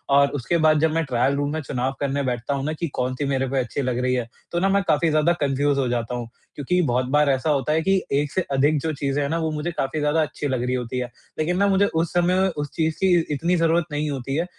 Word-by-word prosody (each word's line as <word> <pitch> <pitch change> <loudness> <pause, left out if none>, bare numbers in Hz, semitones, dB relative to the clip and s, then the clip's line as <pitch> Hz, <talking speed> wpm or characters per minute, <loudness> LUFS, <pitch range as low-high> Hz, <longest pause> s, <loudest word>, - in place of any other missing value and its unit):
और 140 0 +6
उसके 145 +4 -1
बाद 155 -1 +4
जब 160 +1 +2
मैं 165 0 +1
ट्रायल 130 +1 +1
रूम 145 0 -1
में 160 - -2
चुनाव 130 -2 -2
करने 140 0 -1
बैठता 125 +1 -2
हूँ 135 -1 -2
ना 155 - -1
कि 165 +2 -3
कौन-सी 130 +2 -1
मेरे 135 -1 0
पे 135 - -1
अच्छी 125 +3 -2
लग 125 -2 -1
रही 125 0 +1
है 125 -2 -1 0.2
तो 175 - 0
ना, 195 +2 +2
मैं 200 +1 +3
काफ़ी 160 +2 +3
ज़्यादा 155 +2 +3
कन्फ्यूज़ 140 0 +1
हो 130 - +1
जाता 120 0 -2
हूँ। 120 -1 -4 0.3
क्योंकि 180 +6 0
बहुत 130 -5 +1
बार 150 0 +4
ऐसा 135 +3 +1
होता 145 -1 +1
है 160 - +2
कि 190 +2 +2 0.2
एक 145 -1 -2
से 185 - 0
अधिक 145 +3 +3
जो 160 - -1
चीज़ें 140 0 -1
हैं 140 - 0
ना, 165 - 0
वो 160 -1 -1
मुझे 155 +3 -3
काफ़ी 155 -1 -2
ज़्यादा 150 +2 +2
अच्छी 145 0 -3
लग 130 -3 -1
रही 125 +1 0
होती 125 0 -3
हैं। 125 -1 -3 0.3
लेकिन 170 +3 0
ना 200 +1 +3
मुझे 200 0 +3
उस 165 -3 -1
समय 175 +1 +2
में 190 - +3
उस 145 -4 -4
चीज़ 160 -1 0
की 190 -1 +3 0.2
इतनी 165 +5 +1
ज़रूरत 165 0 +2
नहीं 150 +1 -1
होती 135 -1 -3
है 165 +3 0
145 Hz, 275 wpm, -23 LUFS, 135-160 Hz, 0.3 s, और